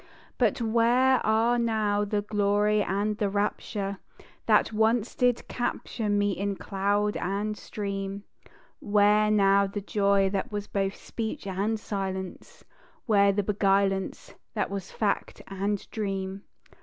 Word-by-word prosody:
But - - +2
where 240 +3 +3
are 225 +3 +2
now 215 -3 +1
the 205 0 -1
Glory 210 0 +2
and 205 +2 -1
the 205 -2 +1
Rapture, 200 -1 -2 0.5
That - - +3
once 220 +1 +2
did 245 -1 +1
capture 240 -2 -3
me 205 0 +2
in 200 +1 -2
cloud 205 +2 0
and 205 +3 -2
stream? 200 -1 -5 0.6
Where 210 +1 +3
now 200 -1 +4
the 200 +1 -4
Joy 200 -1 +2
that 195 +1 -2
was 205 -1 -3
both 195 -1 -2
speech 220 -2 -5
and 200 +3 -1
silence? 190 -3 -5 0.4
Where 200 -3 +4
the 200 +1 0
beguilance 195 -1 0 0.2
that 205 -2 -1
was 195 -2 -5
fact 205 -2 -2
and 195 +1 -3
dream? 195 -2 -4
205 Hz, 130 wpm, -27 LUFS, 195-215 Hz, 0.6 s, now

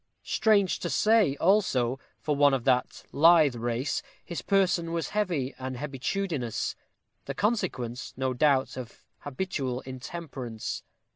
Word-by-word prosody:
Strange 210 -4 +2
to - - -3
say, 215 -10 +3
also, 135 - +2 0.2
for 150 - -1
one 145 -1 +5
of 125 - -3
that 125 -1 +1
lithe 160 -2 +6
race, 120 +3 -2 0.2
his 170 - -5
person 185 -4 +2
was 165 -1 -2
heavy 175 -11 -1
and 130 -1 -4
hebetudinous; 140 - -2 0.5
the - - -5
consequence, 180 - -1
no 130 -1 0
doubt, 135 0 +2
of 125 -3 -9 0.2
habitual 135 -4 -3
intemperance. 130 -3 -6
145 Hz, 125 wpm, -28 LUFS, 130-180 Hz, 0.5 s, lithe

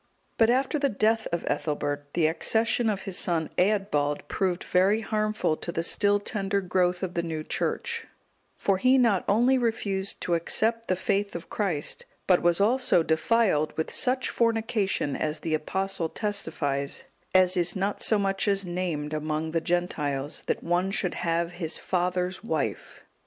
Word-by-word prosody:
But 225 0 +5
after 265 +4 +1
the 280 -1 +2
death 220 +1 +1
of 170 - -1
Ethelbert, 145 -1 -2
the 170 -2 +3
accession 220 +8 +1
of 200 -2 -1
his 195 -2 -2
son 165 -3 0
Eadbald 180 -7 +1
proved 185 -2 -1
very 195 +4 +2
harmful 215 -6 0
to 170 - -5
the 165 0 -2
still 205 +3 +2
tender 200 -1 -1
growth 180 -1 0
of 180 -1 -3
the 170 - 0
new 160 -2 -4
Church; 465 - -2 0.5
for 195 -1 +1
he 255 +5 +5
not 230 -7 +3
only 245 +6 +4
refused 200 -5 -1
to 175 - -1
accept 225 +7 +1
the 185 - +2
faith 200 +2 -1
of 170 - -7
Christ, 175 -9 -2 0.2
but 180 -2 +4
was 175 +1 +3
also 225 -4 +3
defiled 160 -1 +1
with 160 - -2
such 255 0 +1
fornication, 225 - 0
as 155 0 -2
the 160 - -2
Apostle 175 +2 -1
testifies, 145 -10 -2 0.3
as 185 0 +5
is 175 +1 +1
not 200 +1 -1
so 220 - +4
much 195 0 0
as 200 -1 +2
named 175 -4 -3
among 155 +1 -2
the 165 0 0
Gentiles, 150 -5 -2
that - - -1
one 175 +2 +1
should 195 -2 0
have 170 0 -1
his 175 -2 -4
father's 180 +1 -1
wife. 230 - -3
185 Hz, 160 wpm, -27 LUFS, 165-215 Hz, 0.5 s, But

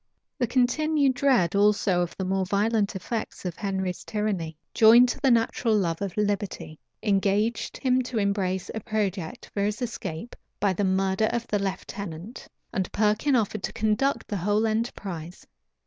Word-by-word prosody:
The 245 - +1
continued 275 +3 +2
dread 250 - +2
also 200 -2 +3
of 175 - -3
the 190 - -2
more 190 +1 0
violent 205 +2 +1
effects 220 +1 -4
of 175 -2 -3
Henry's 190 -3 -3
tyranny, 195 -7 -2 0.2
joined 235 +3 +7
to - - -3
the 270 - +4
natural 230 -1 +2
love 170 -4 -1
of 195 -2 -4
liberty, 205 -6 -2 0.2
engaged 205 +2 +1
him 255 -1 +2
to 250 -1 -4
embrace 195 -3 0
a 220 - -3
project 205 0 -3
for 200 - -1
his 210 +1 0
escape, 225 -4 -5 0.2
by 200 -2 +2
the 205 - -1
murder 190 +2 +2
of 235 -1 -2
the 205 - +1
lieutenant; 195 +1 -5 0.3
and 190 -5 -2
Perkin 215 +7 +2
offered 215 -3 0
to - - -4
conduct 220 +6 0
the 205 - -2
whole 205 +4 +1
enterprise. 195 -7 -3
205 Hz, 160 wpm, -26 LUFS, 190-230 Hz, 0.3 s, joined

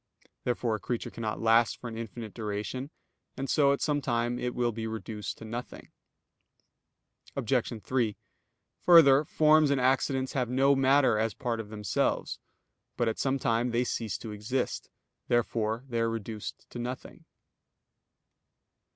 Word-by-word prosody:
Therefore 120 -2 0
a 110 - -2
creature 120 +3 -3
cannot 110 -2 -4
last 115 0 +4
for 120 - -7
an 115 - -6
infinite 115 -1 -7
duration; 110 +5 -4 0.5
and 135 +1 -3
so 140 0 +4
at 140 - 0
some 145 -1 +1
time 120 -1 0
it 125 0 -3
will 120 -1 +1
be 110 0 -4
reduced 110 -1 -5
to 115 - -10
nothing. 120 +3 -7 1.4
Obj. 110 -3 -1
3: 120 -5 0 0.6
Further, 150 -5 +7
forms 155 0 +4
and 140 -1 +2
accidents 130 +1 +1
have 125 -4 0
no 135 +2 +4
matter 135 -4 +4
as 110 0 0
part 120 -3 -2
of 110 -2 -6
themselves. 105 -3 -1 0.6
But 120 -2 +2
at 110 - -4
some 135 0 +1
time 115 -1 +1
they 120 +1 +1
cease 115 -5 -2
to 110 - -8
exist. 105 +6 -3 0.4
Therefore 115 -1 0
they 120 -3 -2
are 115 0 +2
reduced 110 -1 -6
to 120 - -6
nothing. 125 +1 -6
120 Hz, 150 wpm, -29 LUFS, 110-130 Hz, 1.4 s, Further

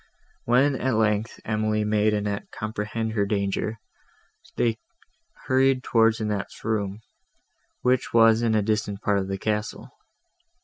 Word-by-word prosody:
When, 130 +4 +3
at 130 -3 0
length, 110 0 0
Emily 110 0 0
made 105 0 +2
Annette 105 -1 -2
comprehend 110 +1 -4
her 100 -2 0
danger, 100 +2 -1 0.8
they 115 -2 0 0.7
hurried 130 0 +2
towards 115 -1 +3
Annette's 105 -2 -4
room, 105 -2 -2 0.8
which 125 0 +1
was 115 0 +5
in 115 -2 +1
a 105 - +2
distant 105 -1 -2
part 100 -1 +2
of 95 - -3
the 95 0 -3
castle. 105 +1 -3
110 Hz, 130 wpm, -25 LUFS, 105-115 Hz, 0.8 s, was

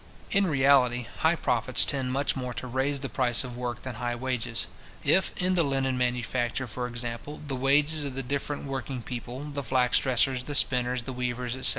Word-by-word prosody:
In 200 -2 +3
reality, 135 -5 +3
high 160 +2 +3
profits 125 -5 +4
tend 130 -2 -1
much 140 +2 0
more 125 -2 -4
to 120 - -5
raise 135 +2 -1
the 135 - -3
price 125 -3 +2
of 125 -2 -7
work 120 -1 -4
than 130 - -5
high 120 -1 -1
wages. 120 -3 -2 0.4
If, 190 - +3
in 185 0 +1
the 180 - +3
linen 135 -3 0
manufacture, 125 0 -1
for 125 +1 -4
example, 120 +4 -5
the 135 - -2
wages 145 +4 +3
of 140 -2 -4
the 135 - -3
different 140 +3 -3
working 135 -2 -4
people, 125 +2 -6
the 140 0 -3
flax 125 -1 +2
dressers, 130 0 +1
the 145 - -4
spinners, 125 -2 +2
the 130 - -6
weavers, 125 0 -3
etc. 130 - +4
130 Hz, 195 wpm, -27 LUFS, 125-140 Hz, 0.4 s, profits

